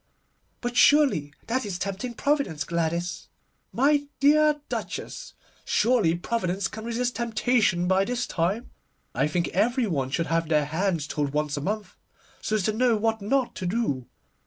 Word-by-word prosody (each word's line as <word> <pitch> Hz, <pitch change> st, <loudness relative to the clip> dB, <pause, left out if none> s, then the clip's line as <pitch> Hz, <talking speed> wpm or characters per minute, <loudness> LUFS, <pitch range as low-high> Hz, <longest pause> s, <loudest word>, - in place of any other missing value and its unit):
'But 245 Hz, 0 st, -3 dB
surely 265 Hz, -, +4 dB
that 255 Hz, +3 st, -1 dB
is 200 Hz, -4 st, -4 dB
tempting 200 Hz, +6 st, -4 dB
Providence, 280 Hz, -, 0 dB
Gladys.' 170 Hz, +3 st, -2 dB, 0.4 s
'My 285 Hz, +2 st, +2 dB
dear 300 Hz, +1 st, +4 dB
Duchess, -, -, -5 dB, 0.3 s
surely 215 Hz, -8 st, +2 dB
Providence 190 Hz, 0 st, -1 dB
can 220 Hz, +2 st, -8 dB
resist 240 Hz, +1 st, -1 dB
temptation 225 Hz, -6 st, +1 dB
by 190 Hz, +1 st, +3 dB
this 245 Hz, +3 st, -2 dB
time. 190 Hz, +8 st, -2 dB, 0.4 s
I 135 Hz, +3 st, +1 dB
think 170 Hz, +2 st, -1 dB
every 240 Hz, +7 st, +1 dB
one 140 Hz, -10 st, -1 dB
should 150 Hz, +5 st, -1 dB
have 165 Hz, -1 st, 0 dB
their 150 Hz, -2 st, +3 dB
hands 165 Hz, 0 st, -1 dB
told 145 Hz, -1 st, -2 dB
once 150 Hz, -1 st, 0 dB
a 145 Hz, -, -3 dB
month, 210 Hz, +6 st, -4 dB, 0.4 s
so 215 Hz, -, -1 dB
as 210 Hz, -, 0 dB
to 215 Hz, -, +1 dB
know 235 Hz, 0 st, +3 dB
what 220 Hz, 0 st, 0 dB
not 250 Hz, +5 st, 0 dB
to 185 Hz, -, -3 dB
do. 175 Hz, -, -1 dB
205 Hz, 160 wpm, -26 LUFS, 165-245 Hz, 0.4 s, surely